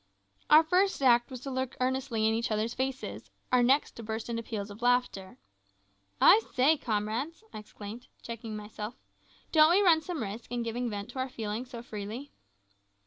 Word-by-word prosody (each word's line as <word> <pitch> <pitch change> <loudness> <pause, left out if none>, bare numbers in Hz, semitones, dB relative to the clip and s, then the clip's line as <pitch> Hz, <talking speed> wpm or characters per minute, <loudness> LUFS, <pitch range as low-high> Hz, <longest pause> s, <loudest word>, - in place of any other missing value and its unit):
Our 310 +2 +8
first 370 +4 +2
act 240 -2 +5
was 255 -3 -8
to 275 - -5
look 260 -1 -3
earnestly 255 -3 0
in 220 - +2
each 230 +2 -1
other's 220 +2 -1
faces; 265 0 -4 0.2
our 250 -1 +5
next 265 +4 +3
to - - -10
burst 220 +1 -5
into 230 0 -2
peals 215 -3 -5
of 205 +3 -11
laughter. 245 -6 0 0.8
"I 435 - +7
say, 270 +5 +5
comrades," 240 - -3
I - - -6
exclaimed, 210 +3 -10 0.2
checking 230 -2 -6
myself, 210 +2 -7 0.6
"don't 310 -1 +7
we 380 +4 +4
run 330 -4 +5
some 315 -5 -4
risk 220 +4 -7
in 240 -1 -1
giving 235 +1 -2
vent 205 +1 -5
to 260 - -7
our 260 0 -1
feelings 225 +1 -5
so 235 -2 -8
freely?" 220 +6 -7
240 Hz, 180 wpm, -30 LUFS, 220-265 Hz, 0.8 s, Our